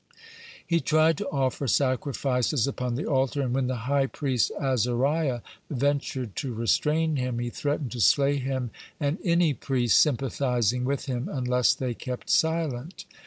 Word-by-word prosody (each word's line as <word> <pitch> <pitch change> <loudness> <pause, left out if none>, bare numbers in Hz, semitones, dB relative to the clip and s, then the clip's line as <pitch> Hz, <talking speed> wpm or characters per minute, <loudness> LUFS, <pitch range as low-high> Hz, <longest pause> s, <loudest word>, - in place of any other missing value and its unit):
He 170 -1 +2
tried 155 0 +3
to 205 - -3
offer 135 -3 -1
sacrifices 130 -1 +1
upon 125 -3 -2
the 145 - -3
altar, 135 0 +1
and 125 -2 -1
when 130 -1 +1
the 130 - -1
high 140 0 +2
priest 130 -5 0
Azariah 130 +1 +1 0.3
(29) 140 - -4
ventured 135 -5 -1
to 130 -4 -3
restrain 150 +7 +1
him, 125 -2 -2
he 120 0 -3
threatened 145 -2 -2
to 120 - -4
slay 140 +4 +4
him 130 -3 -3 0.3
and 145 +3 -1
any 170 -3 +3
priest 125 -3 +2
sympathizing 125 -3 +1
with 140 0 -1
him 125 -2 -3
unless 125 -2 +2
they 125 -2 -2
kept 125 +2 -5
silent. 160 -1 0
135 Hz, 155 wpm, -26 LUFS, 125-145 Hz, 0.3 s, slay